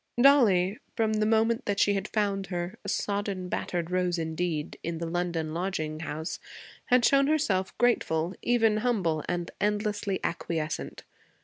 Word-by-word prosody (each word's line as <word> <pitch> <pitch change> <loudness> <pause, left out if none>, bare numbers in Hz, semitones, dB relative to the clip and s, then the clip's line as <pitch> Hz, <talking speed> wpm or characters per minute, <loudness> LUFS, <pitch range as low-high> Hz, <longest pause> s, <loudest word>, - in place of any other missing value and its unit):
Dollie, 220 -8 +5 0.2
from 220 -2 +1
the 215 0 +1
moment 225 +2 +2
that 205 -1 -1
she 205 - +4
had 195 +1 -2
found 200 -3 -1
her, 175 0 -4
a - - -4
sodden, 200 -3 -2
battered 175 -1 -2
rose 180 -1 +1
indeed, 160 -1 -2
in 170 0 -3
the 170 - -3
London 165 -2 -2
lodging 160 -3 -2
house, 160 +1 -4 0.5
had 250 -1 +4
shown 275 0 +4
herself 205 -12 +1
grateful, 180 -8 +1
even 225 -3 +3
humble, 195 -10 0
and 175 -1 -2
endlessly 205 -1 0
acquiescent. 160 -2 -3
190 Hz, 145 wpm, -28 LUFS, 170-215 Hz, 0.5 s, Dollie